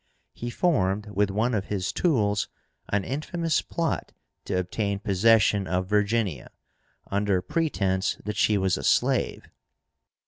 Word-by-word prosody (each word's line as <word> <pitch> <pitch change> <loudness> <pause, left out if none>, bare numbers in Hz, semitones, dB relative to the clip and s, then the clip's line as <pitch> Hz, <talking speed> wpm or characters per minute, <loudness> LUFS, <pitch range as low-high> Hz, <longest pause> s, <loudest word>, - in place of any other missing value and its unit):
He 120 - -5
formed, 105 - 0
with 105 0 +1
one 110 +5 0
of 100 -3 -1
his 100 -3 -2
tools, 105 - +1 0.4
an 100 -1 +1
infamous 155 - -1
plot 170 -1 -3 0.3
to - - -1
obtain 100 +3 -1
possession 100 -1 +3
of 90 0 0
Virginia, 105 - 0 0.6
under 100 -1 +1
pretence 95 - 0
that 105 0 -3
she 105 +1 +3
was 95 -2 +1
a - - -6
slave. - - +1
105 Hz, 130 wpm, -26 LUFS, 95-115 Hz, 0.6 s, possession